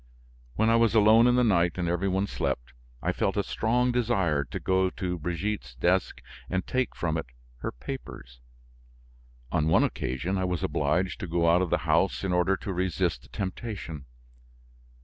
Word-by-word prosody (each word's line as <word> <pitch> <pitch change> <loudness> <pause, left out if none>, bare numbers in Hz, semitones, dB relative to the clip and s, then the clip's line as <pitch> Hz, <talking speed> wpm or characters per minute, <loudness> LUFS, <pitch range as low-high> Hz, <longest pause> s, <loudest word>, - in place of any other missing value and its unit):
When 110 +1 +3
I 115 - +5
was 115 -1 +3
alone 110 +2 +6
in 125 - +4
the 125 - +4
night 85 -6 +3
and 90 -1 -1
every 90 +3 0
one 95 +1 +1
slept, 65 -10 -3 0.3
I - - +1
felt - - -1
a - - +2
strong 125 +3 +1
desire 100 -12 +1
to - - -6
go 95 0 +2
to 90 -2 -4
Brigitte's 85 - -3
desk 90 +9 0 0.3
and 95 0 -1
take 130 -2 -1
from 80 -1 -1
it, 80 - -4 0.3
her - - -4
papers. - - -8 1.1
On 80 -3 +1
one 80 - +4
occasion, 85 +10 -2
I - - 0
was 90 -3 -2
obliged 80 +6 0
to 95 - -5
go 85 0 +1
out 85 +2 +5
of 90 - 0
the - - +2
house 85 +5 +2
in 95 -2 0
order 90 +2 +2
to 95 - -5
resist 90 -9 -1
the - - -19
temptation. 95 - -5
90 Hz, 180 wpm, -27 LUFS, 80-105 Hz, 1.1 s, alone